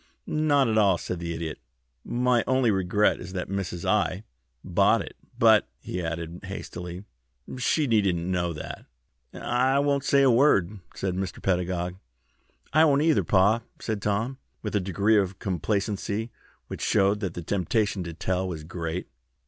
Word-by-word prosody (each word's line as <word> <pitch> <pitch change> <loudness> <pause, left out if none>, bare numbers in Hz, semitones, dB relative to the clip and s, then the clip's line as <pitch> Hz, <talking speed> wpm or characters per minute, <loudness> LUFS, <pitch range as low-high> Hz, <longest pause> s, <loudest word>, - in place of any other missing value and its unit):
"Not 145 -3 +2
at 110 -1 +2
all," 100 -4 +4
said 90 +1 -5
the 85 -1 -4
Idiot. 80 -1 -4 0.4
"My 125 -1 +1
only 130 -3 +3
regret 95 +2 +2
is 90 +1 -8
that 90 -2 -4
Mrs. 95 -3 -3
I. 105 -2 +1 0.4
bought - - +3
it. - - -11 0.2
But," - - +5
he 90 - -5
added, 85 +1 -4
hastily, 90 -2 -7 0.6
"she 150 +4 +2
needn't 105 -8 +2
know 85 0 -1
that." 75 - -7 0.5
"I 130 +3 +1
won't 140 -1 +1
say 140 0 +4
a 135 - +6
word," 105 -7 +3 0.2
said 95 -2 -2
Mr. 95 0 -4
Pedagog. 90 -1 -1 0.8
"I 155 +2 +6
won't, 145 -3 +4
neither, 160 -1 +3
pa," 100 +4 +3 0.2
said 110 -3 -3
Tommy, 110 +7 -1 0.3
with 105 -1 -3
a - - +4
degree 100 +3 +2
of 95 -1 -2
complacency 100 +4 -2 0.3
which - - -7
showed 100 +2 +2
that 95 -5 -4
the 85 - -5
temptation 100 +2 0
to 85 - -6
tell 95 +2 -1
was 80 -4 -5
great. 85 +1 -4
100 Hz, 155 wpm, -26 LUFS, 90-115 Hz, 0.8 s, a